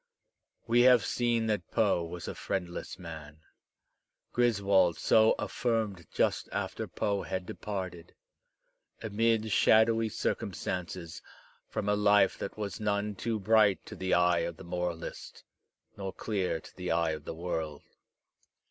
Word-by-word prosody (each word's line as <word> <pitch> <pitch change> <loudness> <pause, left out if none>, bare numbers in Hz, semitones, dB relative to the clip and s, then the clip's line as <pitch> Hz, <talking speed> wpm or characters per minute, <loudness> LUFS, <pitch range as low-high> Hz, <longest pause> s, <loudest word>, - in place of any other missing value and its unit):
We 120 +1 +4
have 125 -5 +6
seen 120 -2 +1
that 105 -2 -1
Poe 105 -6 +2
was 85 +1 -7
a - - -3
friendless 90 -3 -4
man. 80 -3 -9 0.9
Griswold 100 -7 +3
so 110 0 +4
af - - -4
firmed 110 -8 -1
just - - 0
after - - -3
Poe 100 -1 -1
had 95 -1 -4
departed, 95 -4 -6 0.9
amid 110 0 +1
shadowy 110 +2 +4
circum - - -2
stances, 90 -2 -5 0.5
from 110 -2 -3
a 105 - +3
life 105 -1 +4
that 100 - -5
was 100 -2 -4
none 105 0 0
too 110 +2 -2
bright 105 -1 +3
to - - -9
the 95 0 +1
eye 90 0 +4
of 85 0 -3
the - - -10
moralist, 90 -1 -5 0.5
nor 95 -1 -6
dear 95 -6 0
to - - -15
the 90 -1 -5
eye 85 -1 +2
of 75 -2 -6
the - - -5
world. 80 -3 -4
100 Hz, 140 wpm, -30 LUFS, 85-110 Hz, 0.9 s, have